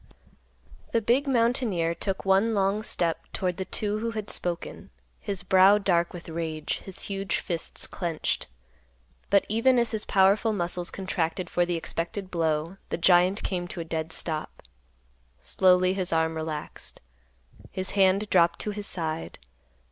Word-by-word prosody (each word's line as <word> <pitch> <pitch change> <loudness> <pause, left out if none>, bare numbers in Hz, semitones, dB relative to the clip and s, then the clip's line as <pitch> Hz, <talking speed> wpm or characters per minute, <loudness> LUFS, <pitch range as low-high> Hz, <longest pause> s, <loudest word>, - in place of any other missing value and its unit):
The 230 - +4
big 245 +6 +2
mountaineer 230 -9 +1
took 190 +3 -3
one 195 +4 +3
long 200 +1 +1
step 170 -6 -1
toward 180 -3 -1
the 190 - -3
two 210 +1 -1
who 230 +1 -2
had 215 -2 -3
spoken, 175 -1 -4 0.3
his 195 -3 -3
brow 190 +2 +6
dark 175 -4 +1
with 175 -1 -9
rage, 160 -2 -3
his 190 - -7
huge 195 -2 -2
fists 170 -2 -2
clenched. 170 -4 -3 0.8
But, 200 0 +4
even 230 +4 +3
as 235 -1 +2
his 220 -2 -1
powerful 200 +3 +3
muscles 175 -2 0
contracted 185 -2 -3
for 175 0 +2
the 175 - 0
expected 175 +4 -4
blow, 165 +1 -1
the - - -2
giant 180 +3 +4
came 175 -2 -2
to 180 0 -7
a 165 - -4
dead 160 0 -3
stop. 155 -2 -3 0.8
Slowly 185 0 +3
his 185 -2 -2
arm 160 0 +1
relaxed. 160 -1 -5 0.7
His 185 0 -3
hand 195 +1 +3
dropped 170 -2 +4
to 210 - -3
his 205 0 -4
side. 160 -2 -3
185 Hz, 150 wpm, -27 LUFS, 170-205 Hz, 0.8 s, brow